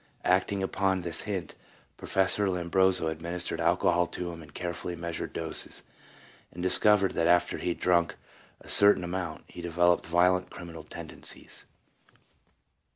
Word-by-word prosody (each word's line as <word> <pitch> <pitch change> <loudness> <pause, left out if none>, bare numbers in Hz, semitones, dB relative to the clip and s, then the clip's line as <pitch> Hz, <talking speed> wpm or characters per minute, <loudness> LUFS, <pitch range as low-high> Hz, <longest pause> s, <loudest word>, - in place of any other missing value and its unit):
Acting 95 +2 +1
upon 95 -1 0
this 85 -1 -1
hint, 95 -6 -4 0.4
Professor 95 +1 +1
Lombroso 90 0 +1
administered 85 +2 -3
alcohol 90 0 +2
to 90 -1 -5
him 85 -1 -9
in 75 - -13
carefully 85 +2 -5
measured 85 0 -5
doses, - - -5 0.7
and 90 - -7
discovered 100 +1 +4
that 85 - 0
after 90 0 +2
he - - -2
had 85 - -3
drunk 85 -1 +2 0.5
a - - -16
cer 100 0 +7
tain - - -6
amount, 90 +1 -4
he 85 - -10
developed 85 0 +1
violent 90 +2 +2
criminal 85 -2 -9
tendencies. 75 - -8
90 Hz, 140 wpm, -28 LUFS, 85-95 Hz, 0.7 s, cer